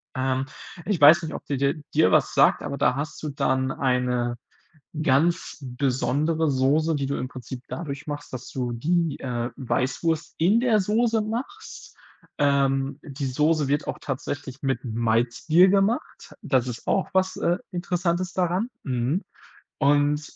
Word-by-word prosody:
Ähm, 130 0 0 0.4
ich 200 -5 0
weiß 155 +4 +8
nicht, 160 - -5
ob - - -7
die 140 - -2
dir 140 +2 +1 0.2
dir 160 +1 +4
was 155 -3 +3
sagt, 135 - +4
aber 140 -1 -4
da 125 - +2
hast 145 +2 -5
du 150 - -2
dann 130 -1 0
eine 125 -2 0 0.6
ganz 165 +5 +1
besondere 140 +5 0
Soße, 145 +5 +2
die 140 -1 -1
du 140 - -2
im 130 - -3
Prinzip 130 0 -9
dadurch 145 -4 -6
machst, 145 0 -6
dass 130 0 -6
du 125 -2 -3
die, 160 +5 0
äh, 120 -2 -3
Weißwurst 140 +4 -1
in 190 +8 +4
der 235 -3 +3
Soße 220 +3 +1
machst. 245 - -6 0.4
Ähm, 140 -1 +1
die 140 -2 -5
Soße 150 +3 +1
wird 145 +2 0
auch - - -3
tatsächlich 135 0 -5
mit 135 -3 -1
Malzbier 120 +9 +3
gemacht, 200 +4 0
das 130 -3 +1
ist 120 -2 -7
auch 195 - +1
was, 190 0 +1
äh, 175 +1 +1
Interessantes 175 0 -1
daran, 185 +5 0
mhm, 130 - -1 0.6
und 145 +1 +3
145 Hz, 155 wpm, -25 LUFS, 130-170 Hz, 0.6 s, weiß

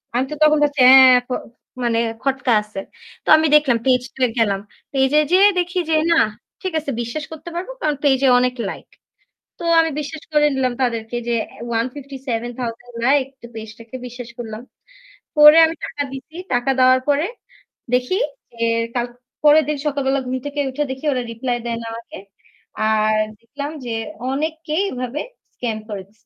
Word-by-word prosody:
আমি 255 - +2
তো - - -3
তখন 305 0 +5
ভাবছি 290 -2 +1
হ্যাঁ 260 -1 +9
প - - -8 0.5
মানে 230 -1 +1 0.2
খটকা 270 -2 0
আছে। 210 -2 -8 0.5
তো - - -3
আমি 315 - +2
দেখলাম 285 -6 +4
পেজ 250 -1 +4
2 260 - -1
এ - - -6
গেলাম। 200 -3 +2 0.3
পেজে 270 +2 +3
যেয়ে 390 +3 +7
দেখি 355 +1 -1
যে 315 - +3 0.2
না 335 - +5 0.4
ঠিক 375 - -3
আছে 290 -2 -4
বিশ্বাস 235 +7 -4
করতে 320 +2 -8
পারবো 365 +8 -4
কারণ 300 -1 +1
পেইজে 275 -1 +3
অনেক 250 0 0
লাইক। - - -8 0.7
তো - - -7 0.2
আমি 325 -1 +1
বিশ্বাস 300 +1 -7
করে 300 0 +4
নিলাম 255 -2 0
তাদেরকে 230 -1 -2
যে 235 - +1 0.2
অ্যা - - -13 0.2
157,000 245 -2 -5
লাইক 275 -1 +3 0.2
তো - - -8
পেজটাকে 220 +2 -9
বিশ্বাস 245 -1 -9
করলাম। 225 -1 -6 0.8
করে 300 +1 +10
আমি 320 - -3
টাকা 285 +1 -4
দিছি। 270 +4 -9 0.2
টাকা 245 +2 +1
দেওয়ার 255 0 +5
পরে 290 +4 +2 0.7
দেখি 250 +8 +1 0.4
যে 235 - -18 0.4
কাল 240 0 0 0.4
পরের 300 +1 +6
দিন 300 -1 -1
সকালবেলা 275 -2 0
ঘুম 255 - -1
থেকে 290 0 -3
উঠে 295 +3 -2
দেখি 265 +3 -9
ওরা 255 - -1
রিপ্লাই 240 +1 -2
দেয় 230 -1 -2
না - - -7
আমাকে 230 0 -9 0.7
আর 215 0 +2 0.2
দেখলাম 285 +5 -6 0.2
যে 235 - -3 0.4
অনেককেই 315 +3 -2
এভাবে 255 +3 -4 0.4
স্ক্যাম 230 -3 -3
করে 200 -2 -4
দিছে। 200 - -30
265 Hz, 170 wpm, -20 LUFS, 240-295 Hz, 0.8 s, করে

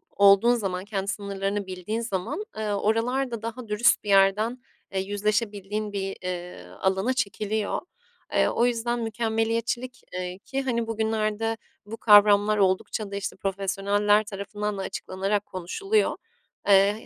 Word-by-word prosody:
olduğun 200 +4 +6
zaman, 190 -4 -3
kendi 200 -2 -3
sınırlarını 200 0 -2
bildiğin 185 +5 -3
zaman, 230 - -3
eee, 215 -1 -2
oralar 235 +5 0
da 230 - -4
daha 230 +1 -6
dürüst 210 +2 +3
bir 205 - -6
yerden, 200 +5 +4 0.3
eee, 190 - -1
yüzleşebildiğin 205 +1 -2
bir, 195 -1 -3
eee, 180 -1 -5 0.2
alana 190 +6 +1
çekiliyor. 215 -3 -1 0.5
Eee, - - +4
o 235 - +2
yüzden 240 0 0
mükemmeliyetçilik, 230 +2 -1
eee, 180 0 -4
ki 270 +6 -3
hani, 235 -3 -1
bugünlerde 220 0 -1 0.3
bu 220 +2 -7
kavramlar 210 -1 +6
oldukça 200 +1 0
da - - -4
işte 200 -1 -4
profesyoneller 200 +2 +1
tarafından 205 0 -4
da - - -3
açıklanarak 195 +2 -2
konuşuluyor. 390 - 0 0.5
Eee, 200 +1 +6
210 Hz, 135 wpm, -26 LUFS, 195-225 Hz, 0.5 s, olduğun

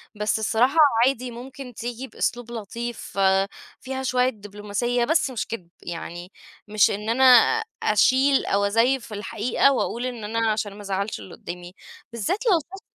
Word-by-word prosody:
بس 210 +1 0
الصراحة 240 +7 +2 0.3
عادي 255 -1 -1
ممكن 250 +2 -9
تيجي 240 +3 -6
بأسلوب 240 -2 -3
لطيف، 235 0 -6
آآ 195 0 +3 0.3
فيها 265 0 -5
شوية 255 0 +2
دبلوماسية 210 +2 -2
بس 315 +1 +2
مش 245 - -3
كدب، 185 -7 -7
يعني 175 +1 -7 0.4
مش 210 -1 +4
إن 210 +2 -4
أنا 250 +3 +2 0.6
أشيل 260 +6 +3
أو 200 +1 +1
أزيّف 230 +5 +2
في 215 - -10
الحقيقة 215 +6 +1
وأقول 245 -1 -2
إن 245 -3 -5
أنا 225 +1 0
عشان 210 -2 -3
ما 205 - -11
ازعَّلش 200 +1 -3
اللي 185 - -11
قدّامي، 175 +1 -9 0.4
بالذات 235 - -1
لو 400 -7 +5
الشخص 360 +5 -9
230 Hz, 160 wpm, -24 LUFS, 205-255 Hz, 0.6 s, لو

